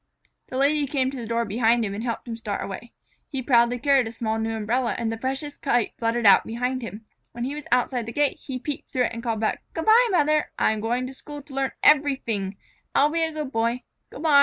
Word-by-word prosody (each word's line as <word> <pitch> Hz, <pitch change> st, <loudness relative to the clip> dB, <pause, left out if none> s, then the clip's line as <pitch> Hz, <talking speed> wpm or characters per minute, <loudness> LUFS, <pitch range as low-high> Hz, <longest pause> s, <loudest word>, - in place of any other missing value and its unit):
The 255 Hz, -, -5 dB
Lady 285 Hz, +1 st, +2 dB
came 265 Hz, -2 st, 0 dB
to 275 Hz, -, -7 dB
the 235 Hz, -3 st, -6 dB
door 230 Hz, +1 st, 0 dB
behind 225 Hz, +2 st, +2 dB
him 200 Hz, -, -3 dB
and 210 Hz, +3 st, -4 dB
helped 235 Hz, 0 st, -3 dB
him 230 Hz, -, -4 dB
start 215 Hz, -3 st, -4 dB
away. 215 Hz, +5 st, -7 dB, 0.4 s
He 270 Hz, -4 st, -4 dB
proudly 240 Hz, -1 st, +4 dB
carried 270 Hz, -1 st, +3 dB
a -, -, -5 dB
small 225 Hz, -1 st, -2 dB
new 225 Hz, 0 st, -1 dB
umbrella, 230 Hz, +3 st, 0 dB
and 230 Hz, -1 st, -1 dB
the -, -, -2 dB
precious 270 Hz, +5 st, -4 dB
kite 245 Hz, -5 st, +1 dB
fluttered 230 Hz, 0 st, 0 dB
out 200 Hz, -, +8 dB
behind 250 Hz, +3 st, -2 dB
him. 225 Hz, -1 st, -8 dB, 0.3 s
When 240 Hz, 0 st, -5 dB
he 265 Hz, +3 st, -2 dB
was 300 Hz, -1 st, -7 dB
outside 245 Hz, -2 st, +1 dB
the -, -, -4 dB
gate, 290 Hz, +3 st, +1 dB
he 265 Hz, -2 st, -5 dB
peeped 285 Hz, +3 st, -5 dB
through 255 Hz, -, +1 dB
it -, -, -1 dB
and 230 Hz, -, -5 dB
called 225 Hz, -2 st, -2 dB
back: 220 Hz, -, 0 dB
"Good 325 Hz, -, -2 dB
by, 465 Hz, +3 st, +6 dB
Mother! 305 Hz, -5 st, +2 dB
I'm 215 Hz, 0 st, +2 dB
going 240 Hz, +3 st, -1 dB
to 260 Hz, -, -7 dB
school 290 Hz, +1 st, -9 dB
to 280 Hz, -, -14 dB
learn 270 Hz, 0 st, -1 dB
everyfing. 235 Hz, -10 st, +2 dB, 0.4 s
I'll 290 Hz, +2 st, +4 dB
be 330 Hz, +1 st, +1 dB
a 320 Hz, -, +1 dB
good 305 Hz, -3 st, -5 dB
Boy. 235 Hz, +1 st, 0 dB, 0.3 s
Good 280 Hz, -, -9 dB
by!" 295 Hz, -3 st, +6 dB
245 Hz, 240 wpm, -24 LUFS, 230-280 Hz, 0.4 s, out